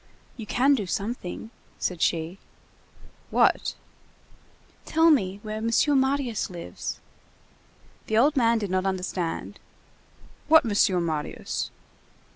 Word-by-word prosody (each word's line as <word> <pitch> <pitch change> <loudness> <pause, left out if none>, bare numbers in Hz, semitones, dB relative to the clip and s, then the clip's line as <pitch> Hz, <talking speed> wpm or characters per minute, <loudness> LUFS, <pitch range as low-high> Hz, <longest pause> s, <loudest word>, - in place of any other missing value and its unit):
"You 220 -3 -8
can 265 +6 +3
do 210 -8 -1
something," 210 +1 -4 0.3
said 180 -3 -3
she. 170 +3 0 0.9
"What?" - - +2 1.1
"Tell 325 +1 +4
me 195 -9 +1
where 215 0 -4
M. 225 +1 -1 0.3
Marius 265 -4 0
lives." 170 - -6 1.1
The 220 - +1
old 285 +6 +4
man 235 -3 +3
did 205 -4 -3
not 185 +1 +1
understand. 185 -2 -3 0.9
"What 315 -2 +6
Monsieur 200 -4 +3
Marius?" 160 -3 -3
215 Hz, 105 wpm, -26 LUFS, 185-250 Hz, 1.1 s, What